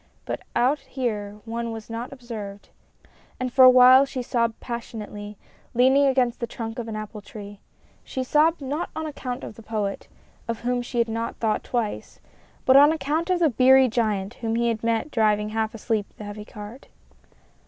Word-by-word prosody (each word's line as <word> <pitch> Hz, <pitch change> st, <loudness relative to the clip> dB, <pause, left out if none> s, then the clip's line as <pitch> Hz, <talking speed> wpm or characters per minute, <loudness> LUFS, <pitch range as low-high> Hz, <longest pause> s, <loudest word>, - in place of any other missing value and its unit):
But -, -, -4 dB
out 270 Hz, +5 st, +3 dB
here 210 Hz, -6 st, -4 dB
one 230 Hz, 0 st, -3 dB
was 225 Hz, -1 st, -7 dB
not 230 Hz, +2 st, -5 dB
observed, 220 Hz, -6 st, -8 dB, 0.7 s
and 255 Hz, -1 st, -3 dB
for 260 Hz, -, +7 dB
a 255 Hz, -, +11 dB
while 255 Hz, +1 st, +8 dB
she 270 Hz, -2 st, -4 dB
sobbed 235 Hz, -2 st, 0 dB
passionately, 210 Hz, -3 st, -7 dB, 0.4 s
leaning 265 Hz, +3 st, +5 dB
against 255 Hz, -3 st, +1 dB
the 235 Hz, -, -2 dB
trunk 225 Hz, 0 st, -6 dB
of 235 Hz, -, -5 dB
an 220 Hz, -, -5 dB
apple 215 Hz, 0 st, -6 dB
tree. 205 Hz, 0 st, -10 dB, 0.4 s
She 260 Hz, -, -4 dB
sobbed 305 Hz, +5 st, +3 dB
not 290 Hz, +5 st, -3 dB
on 315 Hz, -, -3 dB
account 255 Hz, -5 st, -5 dB
of -, -, -7 dB
the 225 Hz, -, -13 dB
Poet 210 Hz, -3 st, -3 dB, 0.4 s
of 230 Hz, -1 st, -3 dB
whom 245 Hz, +1 st, 0 dB
she 240 Hz, +1 st, -6 dB
had 235 Hz, -1 st, +3 dB
not 230 Hz, +1 st, -3 dB
thought 220 Hz, -2 st, 0 dB
twice 235 Hz, -4 st, -3 dB, 0.5 s
but 260 Hz, -, +6 dB
on 290 Hz, +2 st, +8 dB
account 315 Hz, +2 st, -1 dB
of 365 Hz, -, +3 dB
the 335 Hz, -3 st, +3 dB
beery 260 Hz, +2 st, +6 dB
giant 215 Hz, -4 st, -1 dB
whom 225 Hz, -1 st, -1 dB
he 235 Hz, 0 st, +2 dB
had 225 Hz, -1 st, -3 dB
met 230 Hz, +5 st, 0 dB
driving 210 Hz, -2 st, +2 dB
half 220 Hz, 0 st, -2 dB
asleep 220 Hz, -2 st, -1 dB
the -, -, -8 dB
heavy 205 Hz, 0 st, -7 dB
cart. 210 Hz, +6 st, -10 dB
235 Hz, 185 wpm, -24 LUFS, 215-260 Hz, 0.7 s, a